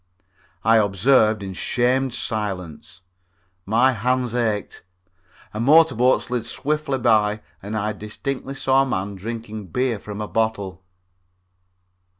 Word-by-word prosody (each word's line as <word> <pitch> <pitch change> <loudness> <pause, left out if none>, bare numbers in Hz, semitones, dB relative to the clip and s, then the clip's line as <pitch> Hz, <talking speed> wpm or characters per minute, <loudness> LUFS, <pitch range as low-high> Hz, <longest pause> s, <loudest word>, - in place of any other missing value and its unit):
I 115 +1 +5
observed 110 +1 +3
in 95 -1 -5
shamed 125 +6 0
silence. 90 -7 -5 0.7
My 120 +5 +4
hands 125 +1 0
ached. 110 -4 -2 0.7
A 105 - -4
motor 155 +7 +5
boat 125 +3 +3
slid 120 -2 -3
swiftly 145 +2 -1
by 110 -3 +2 0.2
and 105 +2 -4
I 105 +1 -1
distinctly 130 +6 -5
saw 135 0 +3
a - - +2
man 100 -4 -2
drinking 110 0 -6
beer 125 +4 -1
from 105 0 -8
the 105 - -3
bottle. 100 -5 -2
110 Hz, 125 wpm, -22 LUFS, 105-130 Hz, 0.7 s, I